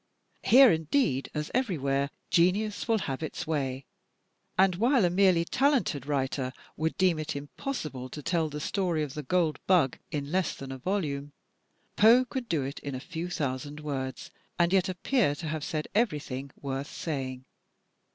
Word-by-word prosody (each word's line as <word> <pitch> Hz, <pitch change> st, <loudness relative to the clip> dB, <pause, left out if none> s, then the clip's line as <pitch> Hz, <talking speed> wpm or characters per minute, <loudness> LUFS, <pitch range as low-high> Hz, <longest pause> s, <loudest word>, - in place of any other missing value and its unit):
Here, 260 Hz, +1 st, +8 dB
indeed, 160 Hz, -, +1 dB
as 150 Hz, 0 st, -3 dB
everywhere, 140 Hz, -, 0 dB, 0.2 s
genius 200 Hz, +6 st, +2 dB
will 225 Hz, -1 st, +3 dB
have 135 Hz, +1 st, -3 dB
its 160 Hz, +2 st, -4 dB
way; 135 Hz, -4 st, -2 dB, 0.7 s
and 185 Hz, -2 st, +4 dB
while 240 Hz, 0 st, +4 dB
a 175 Hz, -, +2 dB
merely 180 Hz, -2 st, +4 dB
talented 235 Hz, -, +1 dB
writer 135 Hz, -2 st, -1 dB, 0.2 s
would 160 Hz, +1 st, -1 dB
deem 180 Hz, -4 st, +3 dB
it 155 Hz, -, -3 dB
impossible 145 Hz, -, -5 dB
to 150 Hz, +3 st, -8 dB
tell 165 Hz, -1 st, +1 dB
the 150 Hz, 0 st, -5 dB
story 170 Hz, -1 st, 0 dB
of 140 Hz, -3 st, -5 dB
*The 150 Hz, -, -4 dB
Gold 160 Hz, +2 st, +1 dB
Bug' 170 Hz, -9 st, +3 dB
in 145 Hz, -1 st, -4 dB
less 185 Hz, -2 st, 0 dB
than 135 Hz, -1 st, -8 dB
a 130 Hz, -, -6 dB
volume, 145 Hz, -4 st, -2 dB, 0.6 s
Poe 235 Hz, +4 st, +7 dB
could 255 Hz, -1 st, -5 dB
do 155 Hz, -5 st, +1 dB
it 135 Hz, +2 st, -5 dB
in 140 Hz, -2 st, -5 dB
a -, -, -4 dB
few 165 Hz, +5 st, -5 dB
thousand 145 Hz, -2 st, -3 dB
words, 140 Hz, +3 st, -4 dB, 0.3 s
and 175 Hz, +1 st, +3 dB
yet 190 Hz, -1 st, +3 dB
appear 185 Hz, -, +1 dB
to 160 Hz, +2 st, -6 dB
have 155 Hz, -1 st, -3 dB
said 155 Hz, -1 st, -3 dB
everything 150 Hz, -, -1 dB
worth 135 Hz, +1 st, -4 dB
saying. 130 Hz, -5 st, -4 dB
155 Hz, 165 wpm, -29 LUFS, 140-185 Hz, 0.7 s, Here